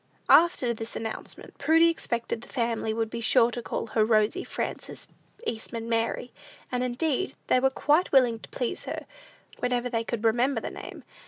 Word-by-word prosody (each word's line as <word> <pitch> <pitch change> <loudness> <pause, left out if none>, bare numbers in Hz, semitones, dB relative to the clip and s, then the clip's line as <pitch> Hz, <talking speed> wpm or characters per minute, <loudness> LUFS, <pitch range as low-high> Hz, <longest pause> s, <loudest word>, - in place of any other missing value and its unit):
After 315 -8 +5
this 225 0 -6
announcement, 225 -1 -7
Prudy 325 +1 +5
expected 235 -8 -2
the - - -12
family 230 -3 -1
would 225 0 -2
be 235 - -4
sure 230 +1 +4
to 240 - -4
call - - -3
her 220 -1 +1
Rosy 220 - +2
Frances - - -5 0.4
Eastman 230 - -4
Mary; 230 +1 -1 0.4
and, 250 0 0
indeed, 280 +8 -1
they 255 - +3
were 265 +1 +3
quite 300 +6 +2
willing 245 -4 +4
to - - -12
please 245 - -3
her, - - -5 0.5
whenever 250 0 0
they 230 -2 0
could 230 -1 -3
remember 240 +3 +2
the - - -5
name. - - -9
235 Hz, 170 wpm, -27 LUFS, 225-260 Hz, 0.5 s, After